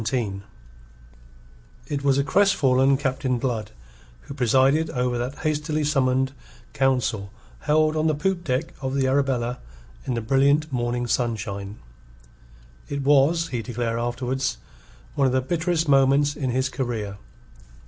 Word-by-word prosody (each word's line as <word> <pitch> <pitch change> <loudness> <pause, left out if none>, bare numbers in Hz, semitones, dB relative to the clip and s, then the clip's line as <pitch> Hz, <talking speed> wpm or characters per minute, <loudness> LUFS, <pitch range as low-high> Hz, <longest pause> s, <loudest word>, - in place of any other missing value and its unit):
THE 110 - -4 0.2
DUPES 95 0 -7 1.5
It 140 -1 -3
was 140 -1 +3
a 140 - +2
crestfallen 140 -7 +3
Captain 130 -2 -1
Blood 115 -4 -2 0.5
who - - -9
presided 135 +4 +3
over 125 -1 -1
that 125 +3 -4
hastily 155 0 0
summoned 135 -3 +1 0.4
council 125 -7 0 0.3
held 155 +1 +2
on 155 +1 +1
the 155 - +2
poop 175 +4 -1
deck 130 +1 -2
of 130 0 -2
the 135 -1 +1
Arabella 130 -3 0 0.5
in 125 - -1
the 115 - -2
brilliant 140 +6 +2
morning 120 0 -1
sunshine. 105 -4 -2 1.1
It 140 -1 -3
was, 145 +4 +3
he 120 -2 -2
declared 115 0 -3
afterwards, 125 - -2 0.6
one 140 -2 +2
of 130 - 0
the 130 - +3
bitterest 165 +3 -1
moments 140 +1 +4
in 135 -4 -2
his 130 +2 0
career. 115 -7 -4
135 Hz, 140 wpm, -24 LUFS, 120-145 Hz, 1.5 s, moments